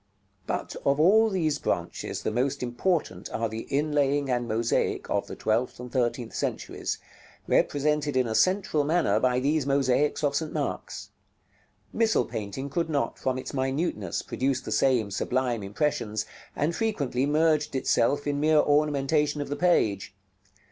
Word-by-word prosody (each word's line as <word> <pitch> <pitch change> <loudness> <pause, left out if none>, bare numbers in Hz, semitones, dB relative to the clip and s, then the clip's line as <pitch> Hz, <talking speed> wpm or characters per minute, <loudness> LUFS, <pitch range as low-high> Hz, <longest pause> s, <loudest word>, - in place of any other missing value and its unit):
§ - - -43
LXIII. 100 -1 -43
But - - -3
of 140 +1 +2
all 215 +7 +5
these 160 -7 0
branches - - -3
the - - -1
most 130 +4 -1
important 125 - -1
are 115 0 -1
the 110 +1 -6
inlaying 145 -1 +1
and 120 -1 0
mosaic 115 +1 0
of - - 0
the - - -7
twelfth 115 +4 -1
and 125 0 -8
thirteenth 120 -2 -1
centuries, - - -3 0.5
represented 145 -1 +1
in 130 - +3
a 110 - -2
central 185 - +2
manner 150 -9 +2
by 125 +1 +2
these 145 +1 +1
mosaics 140 +2 +1
of 145 -1 +1
St. 155 +1 -1
Mark's. - - -4 0.8
Missal 225 -1 +2
painting 110 +6 -5
could 160 +4 -2
not, 145 -3 -1
from 130 -1 -1
its 130 - -6
minuteness, 130 - -1
produce 135 0 -1
the - - -7
same 120 -6 +2
sublime 120 +3 -1
impressions, 105 0 -1 0.3
and 155 +4 0
frequently 145 - 0
merged 150 -1 +2
itself 135 +2 +1
in 145 -1 -1
mere 155 +1 +3
ornamentation 150 0 +2
of 145 - -4
the 145 - -2
page. 105 - +1
140 Hz, 155 wpm, -27 LUFS, 120-150 Hz, 0.8 s, all